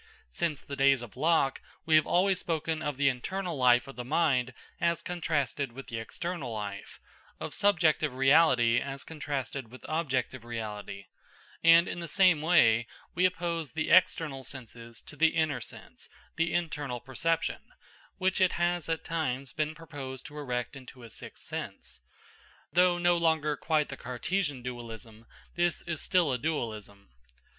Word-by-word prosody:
Since 155 - -2
the 140 - -6
days 135 -2 +4
of 115 - -11
Locke, 160 -4 +2 0.2
we 160 - +1
have 155 - +5
always 190 +1 +3
spoken 160 -1 -2
of 145 -3 -3
the 140 0 +3
internal 175 +7 -2
life 125 -2 +4
of 135 - -10
the 125 - -4
mind 130 -3 +1 0.3
as 170 0 +1
contrasted 145 -7 -2
with 135 +2 -9
the 115 - -4
external 140 +4 -5
life, 100 -2 -6 0.4
of - - -5
subjective 165 -7 +3
reality 130 -3 +5
as 135 -2 -5
contrasted 140 -4 -4
with 130 - -12
objective 130 -6 -1
reality; 105 -4 -6 0.6
and 165 +1 +7
in - - -4
the 170 - -5
same 180 -2 +4
way 120 -9 +4 0.3
we 180 +2 +4
oppose 170 -4 -3
the 160 -1 -1
external 160 -6 +3
senses 115 -3 -9
to - - -10
the 160 0 +3
inner 155 -6 +1
sense - - -11 0.3
(the 165 0 +1
internal 150 -7 -2
perception), 150 +7 -1 0.6
which 190 0 +1
it 185 - +4
has 175 -1 0
at 165 -1 -2
times 140 -5 -2
been 155 +1 -2
proposed 140 -5 -8
to 145 - -10
erect 125 -2 -3
into 130 -2 -12
a 115 - -11
sixth - - -10
sense. - - -7 0.7
Though 180 0 +4
no 175 0 +3
longer 160 -3 +2
quite 155 -1 0
the - - -6
Cartesian 140 +2 -2
dualism, 115 -2 -8 0.3
this 175 -1 0
is 170 -3 -4
still 175 -8 +2
a 125 - -1
dualism. 110 - -4
145 Hz, 155 wpm, -29 LUFS, 125-165 Hz, 0.7 s, and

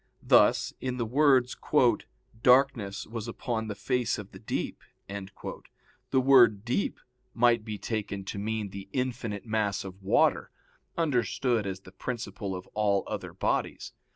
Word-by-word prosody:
Thus - - +4
in 125 -1 -2
the 120 - -1
words, 130 0 +3 0.9
"Darkness 125 -6 +3
was 115 0 -6
upon 115 -1 -3
the 105 - -4
face 125 +3 0
of 105 -2 -8
the - - -11
deep," - - -3 0.3
the 100 +6 -6
word 120 -6 +6
"deep" 125 +11 -1 0.4
might 120 -1 +4
be 110 -1 -5
taken 100 -3 -4
to 100 - -5
mean 110 -1 -2
the 100 0 -8
infinite 125 -5 -2
mass 110 -3 0
of 95 0 -9
water, 95 - +2 0.5
understood 125 - +1
as 95 0 -5
the - - -14
principle 100 -5 -5
of 90 - -7
all 100 -2 +2
other - - -5
bodies. - - -2
110 Hz, 140 wpm, -28 LUFS, 100-125 Hz, 0.9 s, word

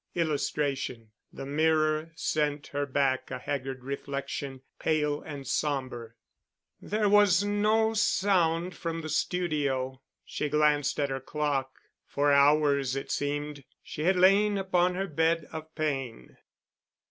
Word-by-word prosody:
[Illustration: 145 -7 -2 0.2
THE - - -8
MIRROR 155 +2 +1
SENT 150 -2 -1
HER 145 0 -1
BACK 135 -1 0
A 130 - -4
HAGGARD 130 -1 -4
REFLECTION, 140 0 -5 0.2
PALE 150 -2 0
AND 145 -3 -8
SOMBER] 130 -4 -2 0.7
There 210 0 0
was 205 -2 +5
no 215 +2 +2
sound 180 -5 +1
from 165 -1 -4
the 155 - -6
studio. 140 -6 -1 0.2
She 150 - -3
glanced 150 -1 +2
at 140 -2 0
her 135 - -2
clock. 135 -1 -2 0.3
For 145 0 +1
hours 140 -2 +4
it 135 - -4
seemed 145 0 -3 0.2
she 150 - -6
had 190 +2 +4
lain 200 +3 +4
upon 180 -2 +1
her 190 +1 -1
bed 160 -1 0
of 160 0 -8
pain. 135 - -3
150 Hz, 125 wpm, -28 LUFS, 140-165 Hz, 0.7 s, was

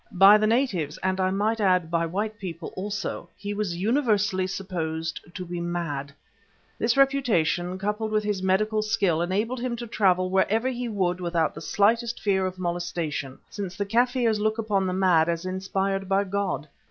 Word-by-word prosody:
By 195 +3 +8
the 215 - +2
natives, 220 - 0
and 190 0 0
I 185 0 +2
might 215 +4 0
add 180 -4 +2
by 170 0 +1
white 210 +5 -3
people 170 -3 -6
also, 200 -3 -4
he 205 0 -4
was 205 -4 -2
universally 205 -4 +1
supposed 165 -4 -3 0.2
to 185 - -5
be 175 0 -5
mad. 165 -5 -3 0.7
This 230 +3 +1
reputation, 215 - +2
coupled 210 +3 -2
with 215 0 +1
his 205 -2 -1
medical 215 +3 +1
skill, 205 -7 +1
enabled 210 +8 -1
him 245 -1 -2
to 240 0 -6
travel 185 -4 +2
wherever 215 +5 +2
he 245 -1 -3
would 185 -4 -1
without 170 -2 0
the - - -9
slightest 230 +4 +1
fear 190 -2 +1
of 185 0 -6
molestation, 170 -6 -3
since 195 -3 -6
the 200 - -1
Kaffirs 235 0 +2
look 215 +1 0
upon 205 -4 0
the 185 - -1
mad 180 -4 +3
as 170 +1 -2
inspired 195 +1 -2
by 195 +1 +3
God. 195 -7 -2
195 Hz, 175 wpm, -26 LUFS, 175-215 Hz, 0.7 s, By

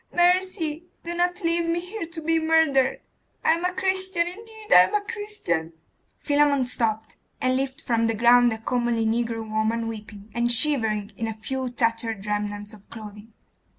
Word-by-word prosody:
mercy! 350 -3 +2 0.2
Do 340 - -4
not 355 +2 0
leave 335 0 +1
me 335 +1 +1
here 360 +1 -6
to 330 -1 -8
be 325 +1 +2
murdered! 315 -5 +3 0.4
I - - +6
am 335 +1 -3
a 360 - +1
Christian; 375 -1 0
indeed 440 +4 -11
I - - +10
am - - -3
a 415 - +2
Christian!' 415 - -3 0.4
Philammon 285 -2 +2
stooped, 220 -3 -2 0.2
and 255 0 +1
lifted 265 0 -3
from 230 -1 +2
the 225 - 0
ground 240 +2 +5
a 220 - -3
comely 235 0 0
negro 225 0 -1
woman, 220 +1 0
weeping, 215 -1 -9
and 235 +1 +1
shivering 225 -6 +2
in 225 - -2
a 220 - -4
few 260 +3 -3
tattered 230 -3 -1
remnants 205 0 -3
of 205 -1 -16
clothing. 210 0 -10
250 Hz, 170 wpm, -25 LUFS, 225-340 Hz, 0.4 s, I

